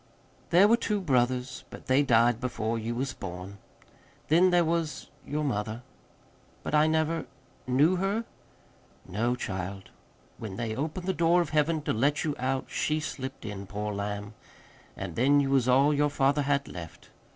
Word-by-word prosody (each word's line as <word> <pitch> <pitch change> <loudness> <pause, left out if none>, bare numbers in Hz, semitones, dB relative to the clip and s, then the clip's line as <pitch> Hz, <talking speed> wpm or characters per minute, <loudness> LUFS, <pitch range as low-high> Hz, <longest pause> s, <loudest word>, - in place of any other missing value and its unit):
"There 185 +4 +6
were 230 +2 +5
two 210 -3 -1
brothers, 130 -5 0
but - - -11
they 130 +2 +4
died 120 -2 +3
before 115 -2 -2
you 115 +2 -3
was 130 +1 -2
born. 95 +2 -8 0.7
Then 175 +4 +5
there 175 -1 +4
was 165 -1 -2 0.2
your 150 +2 -1
mother." 110 -3 -2 0.8
"But - - -4
I 150 +1 +5
never 160 +1 0 0.4
knew 145 +8 +3
her?" 200 +5 -1 0.8
"No, 115 +6 0
child. 95 -3 -5 0.5
When 105 -4 -6
they 115 -1 -3
opened 155 +7 -3
the 190 - 0
door 170 +1 +3
of 170 -4 -1
Heaven 155 0 +1
to - - 0
let 140 +6 +1
you 150 -3 -1
out 130 +1 -1
she 155 +1 0
slipped 135 -5 -6
in, 100 -2 -6
poor 105 +1 -4
lamb. 100 +1 -4 0.6
An' - - -5
then 140 +4 +4
you 135 -1 +1
was 130 -3 +3
all 135 +4 +5
your 145 0 +2
father 140 +1 +2
had 140 -1 0
left. 85 -3 -10
135 Hz, 165 wpm, -28 LUFS, 115-155 Hz, 0.8 s, There